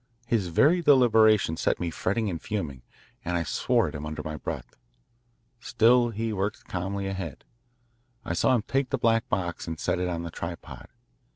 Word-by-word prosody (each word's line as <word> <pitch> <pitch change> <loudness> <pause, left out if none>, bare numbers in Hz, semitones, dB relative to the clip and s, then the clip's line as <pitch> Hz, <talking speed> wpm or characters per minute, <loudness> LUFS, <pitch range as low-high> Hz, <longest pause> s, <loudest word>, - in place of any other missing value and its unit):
His 115 -6 0
very 150 - +4
deliberation 110 - +5
set - - 0
me 85 -1 -2
fretting 105 +7 -1
and 85 -5 -3
fuming, 80 -12 -4 0.4
and 90 0 -1
I 85 - 0
swore - - +1
at - - -6
him 75 - -6
under 75 0 -5
my 80 0 -5
breath. - - -6 0.8
Still, 120 +1 +3
he 115 0 -3
worked 100 +1 -3
calmly 95 +2 -3
ahead. 95 -6 -5 0.8
I - - -2
saw 130 +8 +3
him 115 - 0
take 135 +2 -1
the 135 - 0
black 115 -2 +1
box 85 -2 -2
and 80 -1 -5
set - - 0
it 90 - 0
on 85 -1 -3
the 85 - -6
tripod. 85 +1 -7
95 Hz, 180 wpm, -27 LUFS, 85-115 Hz, 0.8 s, deliberation